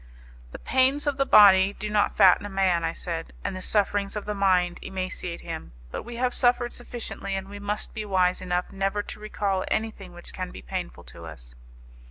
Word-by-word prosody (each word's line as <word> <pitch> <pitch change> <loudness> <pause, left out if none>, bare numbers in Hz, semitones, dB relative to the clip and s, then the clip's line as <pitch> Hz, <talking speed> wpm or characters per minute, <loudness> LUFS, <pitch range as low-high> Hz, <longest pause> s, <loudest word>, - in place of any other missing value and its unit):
"The - - -7
pains 265 +3 +2
of 285 -2 0
the 275 0 +1
body 195 -2 +7
do 210 - -5
not 210 0 +1
fatten 190 +1 +6
a 205 - -5
man," 190 -3 +1
I 165 - 0
said, 165 -1 -5
"and 195 - -3
the 185 - -6
sufferings 200 0 0
of 210 - -4
the 210 - -2
mind 185 -3 +2
emaciate 185 -2 -4
him. - - -7 0.2
But - - -4
we 240 +1 -9
have 250 +1 0
suffered 245 -1 +2
sufficiently, 235 -5 -6
and 195 0 -4
we 205 +1 -9
must 205 +1 -4
be 215 - -4
wise 185 -3 +1
enough 180 -1 -2
never 195 +1 -1
to - - -9
recall 200 -3 -1
anything 215 -4 -3
which 175 0 -10
can 185 -1 -4
be - - -10
painful - - -5
to - - -11
us." - - -9
195 Hz, 205 wpm, -26 LUFS, 185-215 Hz, 0.2 s, body